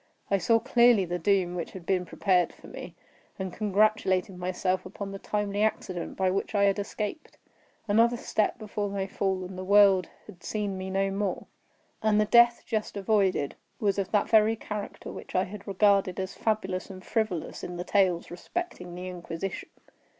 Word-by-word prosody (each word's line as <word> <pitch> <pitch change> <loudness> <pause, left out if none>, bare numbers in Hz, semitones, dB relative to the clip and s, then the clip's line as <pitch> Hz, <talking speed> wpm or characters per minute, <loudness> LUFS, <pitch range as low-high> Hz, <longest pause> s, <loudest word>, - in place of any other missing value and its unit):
I 195 - +3
saw 225 +6 +4
clearly 235 -4 +4
the 175 +1 -3
doom 185 0 +2
which 175 -2 -5
had 185 -3 -9
been 185 -1 +1
prepared 180 -2 +2
for - - -18
me, - - -9 0.4
and 190 -2 -4
congratulated 205 -2 +1
myself 185 +1 -1
upon 195 +1 -7
the 195 - -6
timely 205 0 -2
accident 185 -5 -2
by 190 -1 +2
which 195 +3 -2
I 200 - +4
had 200 0 +3
escaped. 210 +7 -5 0.5
Another 230 +3 +4
step 215 -2 0
before 210 -1 -3
my 195 -1 -2
fall, 190 -1 -1
and 185 +1 -8
the - - -4
world 195 -2 +5 0.2
had 180 -5 -14
seen 205 -2 -2
me 190 0 -5
no 195 +1 0
more. 195 -1 -2 0.6
And 215 -1 +3
the 215 - +4
death 235 +2 +5
just 215 -2 -2
avoided, 195 -7 +1 0.3
was 200 -2 +1
of 195 - -1
that 205 -2 +2
very 220 0 +5
character 210 -2 -6
which - - -9
I 185 - +4
had 200 +2 -9
regarded 195 -2 +3
as 190 0 -3
fabulous 190 -4 -2
and 185 -1 -10
frivolous 215 -8 -2
in 175 0 -5
the 175 - -3
tales 185 -4 +1
respecting 180 - -5
the 180 +1 -6
Inquisition. 180 +1 -5
195 Hz, 180 wpm, -28 LUFS, 185-210 Hz, 0.6 s, world